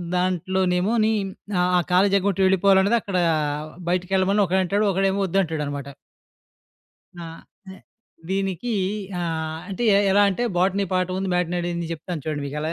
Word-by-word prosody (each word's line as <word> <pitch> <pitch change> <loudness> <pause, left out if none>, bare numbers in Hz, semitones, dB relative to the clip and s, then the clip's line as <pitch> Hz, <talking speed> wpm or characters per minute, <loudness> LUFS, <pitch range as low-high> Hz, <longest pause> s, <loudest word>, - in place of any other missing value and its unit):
దాంట్లోనేమోని 185 +4 +1 0.5
ఆ! - - +3 0.2
ఆ - - +4
కాలేజీ 195 +2 +4
ఎగ్గొట్టి 195 0 -1
వెళ్ళిపోవాలనేది 190 +3 +4
అక్కడా 185 -3 -1 0.7
బయటికెళ్ళమని 190 +3 +1
ఒకడంటాడు. 190 +3 +1
ఒకడేమో 195 +1 +1
ఒద్దంటాడనమాట. 155 -6 -2 1.3
ఆ! 170 - -7 0.5
ఎ - - -14 0.5
దీనికి 195 +4 -2 0.5
ఆహ్, 160 -1 -3
అంటే 195 +5 -4
ఎ - - +5 0.2
ఎలా 205 +1 +5
అంటే 200 +5 -2
బోటనీ 195 +2 +2
పాఠం 185 0 0
ఉంది, 190 0 -2
మ్యాటినీ 180 0 0
ఆడింది 170 -1 -3
జెప్తాను 165 -1 -6
చూడండి 150 -2 -3
మీకెలా 150 +3 -3
185 Hz, 125 wpm, -23 LUFS, 170-195 Hz, 1.3 s, ఎ